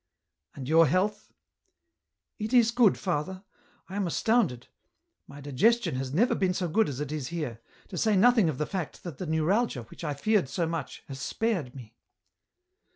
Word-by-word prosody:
" 75 - -42
And 130 -3 -7
your 165 +2 +5
health? 205 +7 0 0.4
" - - -54
" - - -57
It 215 +3 -3
is 235 -2 +5
good, 230 -4 +4
father; 185 +2 -3 0.4
I 190 - -8
am 200 -3 0
astounded; 195 - +1 0.6
my 140 - -11
digestion 220 - +2
has 130 0 -3
never 210 - +3
been 185 -2 0
so 180 - -1
good 215 +5 +2
as 135 -2 -5
it 150 -1 -4
is 150 -4 -3
here; 150 -10 -5 0.3
to 180 - -4
say 215 -2 +2
nothing 225 -3 +5
of 145 - -3
the 150 - -1
fact 180 -4 -5
that 170 -7 -8
the 185 - -4
neuralgia, 160 - +1
which 115 - -13
I 150 -3 -2
feared 195 0 +1
so 170 - -1
much, 165 0 -5
has 135 -1 -7
spared 180 - -2
me." 120 -4 -11
170 Hz, 190 wpm, -28 LUFS, 140-210 Hz, 0.6 s, your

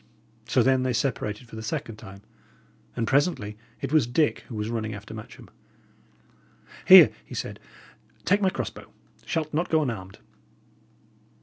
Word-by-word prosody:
So 125 - +3
then 130 0 +3
they 130 -1 0
separated 115 -2 -2
for 115 - -11
the 110 - -6
second 110 0 -4
time; 100 -2 -12 0.7
and 115 - -1
presently 135 - +1 0.3
it - - -4
was 150 -7 +4
Dick 150 +5 +1
who 120 - -8
was 105 0 -3
running 110 -2 -3
after 105 +2 -10
Matcham. 110 -1 -11 1.4
"Here," - - +10
he - - -10
said, - - -5 0.7
"take 200 +3 +3
my 190 - +3
cross - - -4
bow; - - -13 0.4
shalt 155 -2 -2
not 170 +4 0
go 160 -1 +3
unarmed." 95 -8 -5
115 Hz, 150 wpm, -26 LUFS, 110-150 Hz, 1.4 s, Here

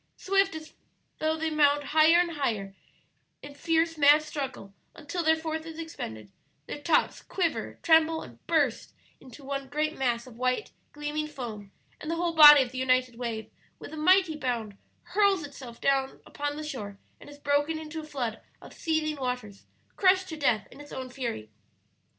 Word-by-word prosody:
Swift 390 -2 +1
as 315 0 -9 0.5
thought 315 0 0
they 320 0 0
mount 290 -1 +3
higher 310 +3 +5
and 350 -1 +1
higher, 220 -10 -2 0.7
in 285 - -9
fierce, 325 +2 0
mad 295 +1 +6
struggle, 275 -10 -6 0.2
until 330 +3 -4
their 320 0 +4
force 320 0 -4
is 325 -1 -9
expended; 110 - -7 0.3
their 290 - -7
tops 330 - +1
quiver, 345 -4 -2
tremble, 320 0 +4
and - - -14
burst - - 0 0.2
into 260 +2 -14
one 275 0 -4
great 305 +3 -1
mass 240 -3 -1
of 245 -3 -14
white, 255 +11 -1 0.2
gleaming 295 +1 -3
foam; 230 -9 -8 0.3
and 305 - -7
the 335 - 0
whole 340 0 -1
body 295 -3 +10
of 245 - -8
the 255 - -5
united 255 -2 +1
wave, 230 -3 -4 0.3
with - - -10
a - - -5
mighty 360 +1 +4
bound, 235 -7 -3 0.3
hurls 400 -5 +2
itself 260 -4 -11 0.5
upon 290 0 -4
the 310 - -5
shore 210 -10 -6 0.2
and - - -13
is 290 - -12
broken 290 +2 0
into 315 0 -7
a - - -7
flood 255 -7 -4 0.2
of - - -13
seething 315 -2 -1
waters 250 -6 -5 0.3
crushed 375 -1 +4
to 320 - -5
death 265 -8 +1
in 290 - -12
its 290 - -13
own 260 -1 -6
fury. 235 - -5
295 Hz, 175 wpm, -28 LUFS, 255-320 Hz, 0.7 s, body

